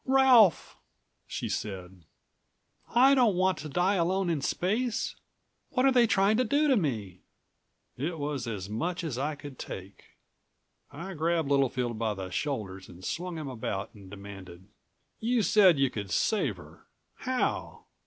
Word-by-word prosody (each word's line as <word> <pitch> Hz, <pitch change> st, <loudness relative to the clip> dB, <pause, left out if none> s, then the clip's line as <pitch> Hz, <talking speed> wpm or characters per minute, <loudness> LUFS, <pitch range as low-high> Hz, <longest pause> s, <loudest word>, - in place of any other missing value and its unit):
"Ralph!" 260 Hz, -7 st, +5 dB, 0.5 s
she -, -, -4 dB
said. 95 Hz, -4 st, -5 dB, 0.9 s
"I 265 Hz, +3 st, +7 dB
don't 240 Hz, -7 st, +4 dB
want 185 Hz, -2 st, +1 dB
to 155 Hz, 0 st, -6 dB
die 180 Hz, +6 st, +2 dB
alone 180 Hz, +1 st, +1 dB
in 155 Hz, -4 st, -1 dB
space! 220 Hz, -, -1 dB, 0.5 s
What 255 Hz, -, +1 dB
are 270 Hz, -, +6 dB
they 245 Hz, -2 st, +5 dB
trying 200 Hz, +1 st, +3 dB
to 255 Hz, -, +3 dB
do 290 Hz, +6 st, +2 dB
to 270 Hz, -, +4 dB
me?" 110 Hz, -, -2 dB, 0.8 s
It 160 Hz, +6 st, -3 dB
was 145 Hz, -4 st, -3 dB
as 100 Hz, -5 st, -4 dB
much 170 Hz, -, -3 dB
as 140 Hz, -7 st, -3 dB
I 150 Hz, +2 st, -1 dB
could 145 Hz, -2 st, -11 dB
take. 95 Hz, +1 st, -9 dB, 0.7 s
I 190 Hz, +3 st, -7 dB
grabbed 165 Hz, -2 st, 0 dB
Littlefield 125 Hz, -4 st, +1 dB
by 110 Hz, -2 st, -1 dB
the 95 Hz, -1 st, -6 dB
shoulders 95 Hz, -8 st, -4 dB
and 90 Hz, 0 st, -12 dB
swung 175 Hz, 0 st, -4 dB
him 155 Hz, -2 st, -5 dB
about 110 Hz, -4 st, -4 dB
and 100 Hz, -4 st, -14 dB
demanded. 95 Hz, -2 st, -11 dB, 0.5 s
"You 235 Hz, 0 st, +1 dB
said 190 Hz, -7 st, +5 dB
you 135 Hz, -2 st, +2 dB
could 100 Hz, -3 st, -5 dB
save 205 Hz, -, +1 dB
her. -, -, -15 dB, 0.3 s
How? 255 Hz, 0 st, -2 dB
150 Hz, 155 wpm, -29 LUFS, -, 0.9 s, I